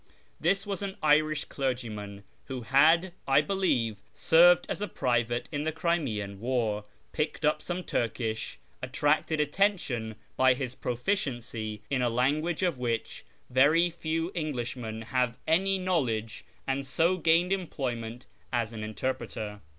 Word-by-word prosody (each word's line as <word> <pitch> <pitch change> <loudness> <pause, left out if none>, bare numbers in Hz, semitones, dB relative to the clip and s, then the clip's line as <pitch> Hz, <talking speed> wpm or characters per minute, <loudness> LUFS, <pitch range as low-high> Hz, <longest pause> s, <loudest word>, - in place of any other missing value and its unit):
This 195 +5 +1
was 200 -2 -3
an 195 -1 -4
Irisli 155 0 +3
clergyman, 110 -7 -4 0.2
who 130 -2 -5
had, 160 +8 +4
I 135 +1 +5
believe, 135 - 0
served 175 +2 +6
as - - -4
a 205 - -1
private 120 - 0
in 145 - -2
the 160 +1 -1
Crimean 135 - -1
War, 110 -3 -1 0.3
picked 155 +1 -2
up 150 0 +2
some 180 +2 -4
Turkish, 115 -4 -2 0.2
attracted 155 +1 +1
attention 150 - 0 0.2
by 130 -1 +5
his 130 -1 -4
proficiency 120 - -3
in 135 -2 +1
a 125 - +2
language 150 +9 +1
of 170 -8 0
which 115 -2 -2 0.3
very 155 +7 +5
few 165 +1 -2
Englishmen 120 -8 -4
have 125 0 0
any 190 +4 +2
knowledge, 130 - -1 0.2
and 135 +1 -1
so 165 +7 +1
gained 170 +2 +3
employment 125 -10 -4 0.3
as 115 -1 -1
an 110 -1 -5
interpreter. 110 -1 -4
135 Hz, 135 wpm, -29 LUFS, 115-165 Hz, 0.3 s, served